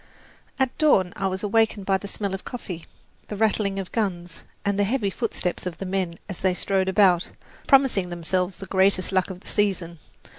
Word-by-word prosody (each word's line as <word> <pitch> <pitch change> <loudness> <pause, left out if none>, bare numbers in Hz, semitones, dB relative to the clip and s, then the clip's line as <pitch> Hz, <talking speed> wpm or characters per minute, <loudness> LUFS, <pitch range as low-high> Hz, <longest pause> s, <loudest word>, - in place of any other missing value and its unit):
At 265 -2 0
dawn 195 - +4
I 195 - -1
was 190 +1 -3
awakened 210 -1 +2
by 195 0 +2
the 200 - -7
smell 200 -1 -3
of 195 - -5
coffee, 185 -9 -7 0.4
the 210 - -5
rattling 205 -2 +1
of 195 -2 -5
guns, 175 -6 -2 0.2
and 200 0 +1
the - - +4
heavy 205 -1 0
footsteps 185 -5 -2
of 170 -2 -5
the 195 - -5
men 185 -3 -2
as 195 -4 -6
they 185 -1 +1
strode 190 0 +1
about, 190 -3 +4 0.4
promising 265 -10 +4
themselves 180 +2 -1
the 195 - -7
greatest 190 0 +2
luck 185 0 +1
of 185 -1 -8
the - - -17
season. 185 -5 -1
195 Hz, 190 wpm, -24 LUFS, 180-205 Hz, 0.4 s, dawn